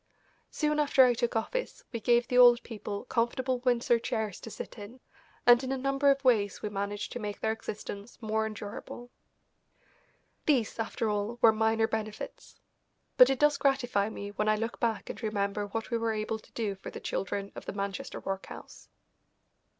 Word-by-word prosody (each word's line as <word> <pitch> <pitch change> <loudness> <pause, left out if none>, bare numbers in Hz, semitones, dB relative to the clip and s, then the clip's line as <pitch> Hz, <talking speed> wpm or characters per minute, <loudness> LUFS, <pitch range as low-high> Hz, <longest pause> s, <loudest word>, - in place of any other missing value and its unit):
Soon 300 -1 0
after 280 -3 +6
I 245 - +4
took 235 0 -1
office - - -2
we 230 - -3
gave 240 +2 +3
the 250 - 0
old 245 -1 +8
people 210 -3 -6
comfortable 250 +2 0
Windsor 240 -1 +2
chairs 220 -4 -3
to - - -9
sit 220 - -8
in, 210 +5 -10 0.5
and 240 +1 +7
in 260 - -3
a 270 - 0
number 275 +2 +2
of 275 0 +2
ways 215 -6 +2
we 210 - -1
managed 200 +1 -3
to 245 - -5
make 205 -2 -5
their 220 - 0
existence 210 0 -7
more 220 -1 0
endurable. 215 +3 -8 1.4
These, 245 -7 +2
after 225 0 -1
all, 210 +2 -1
were 225 - +7
minor 220 0 +2
benefits. 215 -1 -6 0.6
But 250 - +9
it 270 - +1
does 295 0 +4
gratify 245 -7 +1
me 205 -2 -6
when 210 +1 0
I 215 - +4
look 225 +2 -3
back 230 -3 -1
and - - -7
remember 205 -1 -1
what 225 +4 -4
we 235 - +1
were 225 -1 0
able 215 +1 -2
to - - -21
do 215 -4 -1
for 190 - -9
the - - -8
children 200 0 -3
of - - -9
the - - -3
Manchester 200 0 -4
workhouse. 195 0 -7
225 Hz, 180 wpm, -30 LUFS, 210-245 Hz, 1.4 s, But